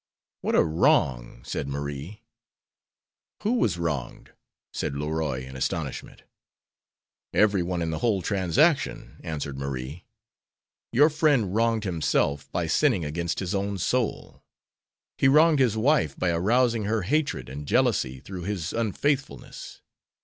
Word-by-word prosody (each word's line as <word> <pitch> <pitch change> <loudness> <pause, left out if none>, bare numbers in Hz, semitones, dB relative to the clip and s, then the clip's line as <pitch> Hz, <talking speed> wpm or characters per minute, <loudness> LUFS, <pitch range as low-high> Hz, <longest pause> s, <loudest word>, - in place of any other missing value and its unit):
"What - - 0
a - - +6
wrong!" 65 -6 +1
said - - -3
Marie. 70 +9 -5 1.2
"Who 220 - +1
was 160 - +1
wronged?" 80 -7 -4 0.4
said 70 - -3
Leroy, 75 -3 -2
in 65 0 -10
astonishment. 65 - -4 1.1
"Every 105 -3 +4
one 85 0 -2
in 80 - -2
the 80 - -3
whole 105 -6 +1
transaction," 100 - +1
answered 70 -4 -4
Marie. 70 +3 -5 0.9
"Your 145 +6 +5
friend 145 - +2
wronged 115 0 +1
himself 80 -5 0
by 90 - -1
sinning 100 - +2
against 85 +3 -2
his 90 -2 -3
own 100 0 -1
soul. 125 +4 -2 0.8
He - - +4
wronged 155 +2 +5
his 120 -5 +2
wife 110 - +2
by 90 - +1
arousing 115 +6 +2
her 110 -1 0
hatred 140 - 0
and 70 +3 -7
jealousy 65 -1 +1
through 90 +5 -8
his 95 -5 -3
unfaithfulness. 130 +5 -2
90 Hz, 130 wpm, -26 LUFS, 75-115 Hz, 1.2 s, a